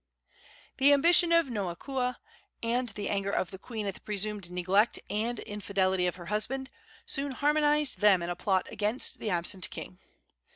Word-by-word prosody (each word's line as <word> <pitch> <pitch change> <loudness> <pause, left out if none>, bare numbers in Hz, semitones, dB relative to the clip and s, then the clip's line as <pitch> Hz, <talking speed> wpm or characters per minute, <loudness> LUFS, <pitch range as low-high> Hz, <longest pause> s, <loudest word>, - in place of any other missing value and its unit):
The 280 +1 +6
ambition 335 +4 +5
of 335 -1 +5
Noakua, 250 +4 -3 0.5
and 240 +1 0
anger 200 -1 -1
of 185 -3 -1
the 190 - -9
queen 220 -1 -6
at 200 - -2
the - - -14
presumed 210 -2 -2
neglect 185 +5 +2
and 225 +3 -1
infidelity 190 -3 -1
of 175 - -2
her 175 -1 -10
husband, 245 +8 -2 0.3
soon 275 -1 -2
harmonized 295 0 +2
them 200 -4 +5
in 170 - -3
a - - -3
plot 190 +1 0
against 215 +4 -1
the 215 - -3
absent 180 +1 +2
king. 180 - -8
210 Hz, 160 wpm, -29 LUFS, 190-265 Hz, 0.5 s, The